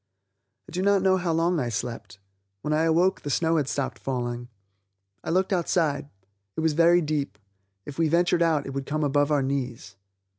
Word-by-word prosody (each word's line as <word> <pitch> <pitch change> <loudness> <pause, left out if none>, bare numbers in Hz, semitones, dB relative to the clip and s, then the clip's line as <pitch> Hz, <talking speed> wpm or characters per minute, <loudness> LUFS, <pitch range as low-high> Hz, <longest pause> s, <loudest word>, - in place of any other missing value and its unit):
I - - -12
do 180 - -2
not 200 -1 +3
know 190 0 +4
how 175 -2 -1
long 165 +1 +1
I 125 -4 -1
slept; 115 -1 -5 0.5
when 150 - -1
I 155 +1 +2
awoke 170 +4 +2
the 145 - -5
snow 165 +3 +1
had 145 -4 0
stopped 130 -4 -3
falling. 120 -2 -3 0.8
I - - -5
looked 185 +3 +1
outside. 160 -5 0 0.5
It - - 0
was 160 -1 +2
very 170 +2 +5
deep; 145 -9 -2 0.5
if 145 +2 -8
we 165 -2 +3
ventured 175 +1 +2
out 160 -4 +2
it 135 - -6
would 135 0 -4
come 155 +1 -1
above 145 0 +2
our 145 -2 +2
knees. 125 -7 -4
155 Hz, 190 wpm, -26 LUFS, 135-170 Hz, 0.8 s, very